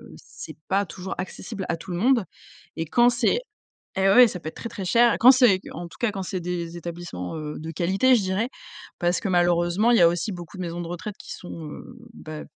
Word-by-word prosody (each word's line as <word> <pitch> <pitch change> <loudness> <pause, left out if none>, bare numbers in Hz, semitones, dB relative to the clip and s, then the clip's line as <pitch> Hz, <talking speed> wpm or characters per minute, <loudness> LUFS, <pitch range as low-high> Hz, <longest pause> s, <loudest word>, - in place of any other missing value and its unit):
c'est - - -11
pas 195 +1 +2
toujours 190 0 -7
accessible 190 +2 -6
à 170 - 0
tout 175 +3 -9
le 175 - -2
monde 240 +3 +3 0.5
et 165 - -2
quand 240 +9 +4
c'est 240 - +1 0.6
et 190 0 +3
ouais, 240 +4 +7
ça 180 - -6
peut 160 - -9
être 155 - -6
très, 230 - -6
très 195 -3 -6
cher 235 +5 +4
et - - -1
quand 250 +3 +8
c'est 245 -8 +5
en 170 +2 -6
tout - - -16
cas 240 -3 +1
quand 195 -2 -4
c'est 185 0 -3
des 175 -1 -4
établissements, 170 - -6
heu, 150 -1 -5
de 160 +1 -6
«qualité», 190 - +3
je 230 - +2
dirais, 190 +4 -1 0.5
parce 175 0 +1
que 220 - -4
malheureusement, 175 +4 +2
il 240 - +5
y - - +4
a 170 - +8
aussi 175 +5 -1
beaucoup 175 -1 -9
de - - -5
maisons 170 -1 -4
de 170 - -6
retraite 175 +4 -6
qui - - -8
sont, 165 -3 -8
heu, - - -9 0.3
bah 155 -7 -8
180 Hz, 240 wpm, -24 LUFS, 170-215 Hz, 0.6 s, quand